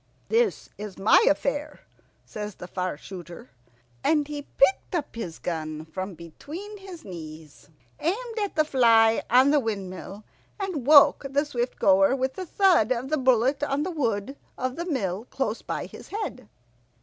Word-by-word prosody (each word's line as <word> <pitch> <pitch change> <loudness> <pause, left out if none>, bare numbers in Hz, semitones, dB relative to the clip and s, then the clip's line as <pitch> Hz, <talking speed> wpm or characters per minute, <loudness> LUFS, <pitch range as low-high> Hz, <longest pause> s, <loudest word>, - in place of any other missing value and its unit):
"This 455 0 +1
is 210 -2 -7
my 195 - +5
affair," 290 +9 -1 0.4
says 210 -1 -6
the 180 - -9
Far 180 -3 -3
shooter, 170 -5 -10 0.5
and 300 -2 +2
he 295 -1 -5 0.2
picked 275 +6 +3
up 300 -8 -3
his 175 -8 -5
gun 155 -2 -4
from 185 +3 -6
between 315 - -9
his 370 -4 -11
knees, 155 -5 -10 0.3
aimed 450 +7 -2
at 405 -5 -2
the 310 -1 +3
fly 230 -5 +4
on 255 +4 +6
the 295 - +4
windmill, 200 -3 -5 0.4
and 360 -10 -3
woke 290 -1 +7
the 285 +2 +1
Swift 245 -4 -3
goer 195 +5 +4
with 260 0 -1
the 370 -1 -6
thud 350 - +3
of 255 +1 -1
the 310 - +2
bullet 260 +2 +3
on 290 0 0
the 365 - -3
wood 245 - -2 0.2
of 255 0 -2
the 340 - -4
mill 210 - -2
close 245 -4 -3
by - - -4
his - - -12
head. 320 - -5
255 Hz, 160 wpm, -26 LUFS, 195-300 Hz, 0.5 s, woke